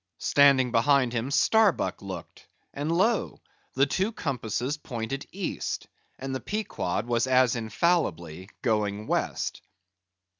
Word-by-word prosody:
Standing 140 -3 +4
behind 125 +1 +3
him 120 +2 -2
Starbuck 215 +6 +2
looked, - - -9 0.3
and 145 +3 -2
lo! 205 +6 +1 0.4
the 135 +1 +4
two 190 +9 0
compasses 130 - -2
pointed 135 -1 -5
East, 195 -1 -4 0.3
and 135 0 -5
the 130 - -2
Pequod 160 - -3
was 120 +1 +1
as 130 -1 +4
infallibly 110 - -1
going 105 -2 0
West. - - -2
130 Hz, 115 wpm, -27 LUFS, 115-150 Hz, 0.4 s, Standing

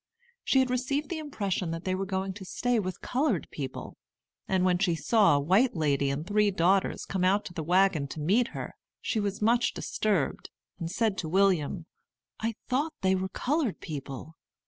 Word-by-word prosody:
She - - +2
had 255 -1 0
received 275 +4 -1
the 340 - -3
impression 200 - -2
that 165 +1 -4
they 185 - -1
were 190 +1 -2
going 190 0 -2
to 195 0 -9
stay 245 +5 0
with 185 -3 -4
colored 250 - 0
people; 135 -3 -6 0.5
and 185 -1 +2
when 180 -1 +3
she 180 -3 +2
saw 170 - +4
a - - +3
white 190 - +3
lady 140 -3 +1
and 140 +3 -2
three 210 +2 +3
daughters 190 +1 +1
come 190 -2 -2
out 195 +3 +3
to 175 - -8
the 165 - -4
wagon 180 -2 +3
to 155 - -7
meet 205 +11 +2
her, - - -6 0.3
she 220 - -1
was 205 0 -2
much 235 +2 +3
disturbed, 200 -9 -1 0.3
and 165 -2 -3
said 210 +1 0
to 160 - -3
William, 180 -3 +2 0.5
"I 225 0 -2
thought 290 +5 0
they 190 0 +3
were 190 0 -1
colored 275 - -1
people." 145 0 -7
190 Hz, 190 wpm, -28 LUFS, 165-225 Hz, 0.5 s, saw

